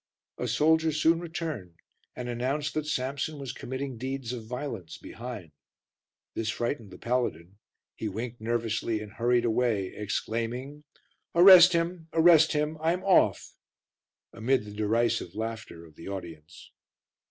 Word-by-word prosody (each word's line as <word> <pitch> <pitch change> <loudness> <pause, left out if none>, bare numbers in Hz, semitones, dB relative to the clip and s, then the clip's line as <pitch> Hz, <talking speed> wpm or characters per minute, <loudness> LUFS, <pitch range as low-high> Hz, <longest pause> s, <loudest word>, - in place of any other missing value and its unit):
A - - -2
soldier 160 +1 +3
soon 160 +2 +3
returned 160 - -5 0.4
and 125 - -5
announced 130 +5 -2
that 155 -1 -2
Samson 140 +2 -2
was 135 -3 -6
committing 130 -2 -5
deeds 130 -1 -4
of 115 -3 -6
violence 115 - -6
behind. 110 -8 -8 0.8
This 115 -1 -2
frightened 120 -1 -3
the 90 - -12
paladin; 100 -7 -2 0.3
he 110 - -4
winked 115 +3 -6
nervously 115 -1 -1
and 105 -1 -8
hurried 120 0 +2
away, 110 -5 0
exclaiming 115 +7 -4 0.5
"Arrest 180 0 +9
him, 170 0 -1
arrest 160 -1 +6
him; 150 +1 -1
I'm 170 +3 0
off," 195 -1 +3 0.8
amid 115 0 0
the 105 - -9
derisive 110 -3 0
laughter 110 -6 -6
of 80 - -17
the 80 - -11
audience. 85 -5 -9
120 Hz, 130 wpm, -28 LUFS, 110-150 Hz, 0.8 s, Arrest